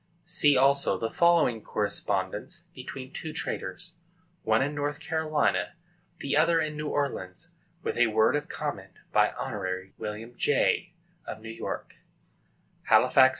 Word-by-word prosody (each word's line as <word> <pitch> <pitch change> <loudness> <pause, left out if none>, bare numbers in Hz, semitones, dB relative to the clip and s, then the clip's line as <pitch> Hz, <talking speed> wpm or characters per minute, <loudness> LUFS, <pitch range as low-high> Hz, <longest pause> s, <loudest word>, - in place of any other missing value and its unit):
See 145 -2 +4
also 135 -6 +4
the 115 +4 -2
following 170 -10 +4
correspondence 105 - -2
between 130 +1 -8
two 160 -1 -5
traders, - - -4 0.4
one 110 +3 +3
in 145 +2 -2
North 145 0 -2
Carolina, 155 -1 0 0.5
the 140 - 0
other 165 +2 +4
in 155 -1 -1
New 150 0 -3
Orleans; 130 -12 -3 0.3
with - - -2
a 120 - +6
word 110 +4 +3
of 145 0 -2
comment, - - -4 0.2
by - - +4
Hon. 95 -1 -3
William 110 +3 -5
Jay, 155 +6 +2 0.3
of 110 - -5
New 115 +1 -8
York: 115 - -5 1.0
_Halifax, 130 - +7
N. - - +1
135 Hz, 140 wpm, -28 LUFS, 110-150 Hz, 1.0 s, Halifax